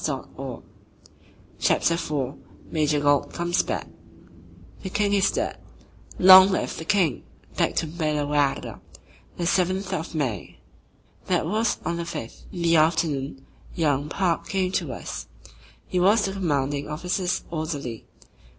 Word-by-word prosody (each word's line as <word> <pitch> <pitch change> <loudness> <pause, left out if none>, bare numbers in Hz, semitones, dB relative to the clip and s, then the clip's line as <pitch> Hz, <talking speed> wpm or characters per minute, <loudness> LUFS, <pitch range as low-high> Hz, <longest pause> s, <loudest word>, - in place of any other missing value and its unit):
CHAPTER 170 - +2
IV 150 -6 -2 0.4
MAJOR 150 -2 +1
GAULT 145 -1 +2
COMES 175 +1 +1
BACK - - -3 1.0
"The 190 - -5
King 205 +1 +1
Is 200 -1 +4
Dead": - - -2 0.6
"Long 185 +1 +10
Live 190 - -1
the 160 - -6
King" 180 -7 +1 0.3
Back - - +1
to - - +1
Belle 155 -2 -1
waarde 145 -1 0 0.6
The 175 - -2
Seventh 185 +2 +1
of 165 -1 -4
May. 130 - -3 0.7
That - - +1
was 215 +7 0
on 170 - -1
the 170 - -3
fifth. 115 -8 -7
In 175 -2 -5
the 165 -1 +4
afternoon 150 -4 +1 0.3
young 145 -3 +1
Park 175 -1 0
came 185 -1 0
to 170 -7 -1
us. 120 - -6 0.6
He 180 - -1
was 205 +4 +4
the 195 - -2
Commanding 145 -6 -1
Officer's 180 +4 -2
orderly. 145 -8 -4
165 Hz, 130 wpm, -25 LUFS, 145-185 Hz, 1.0 s, Long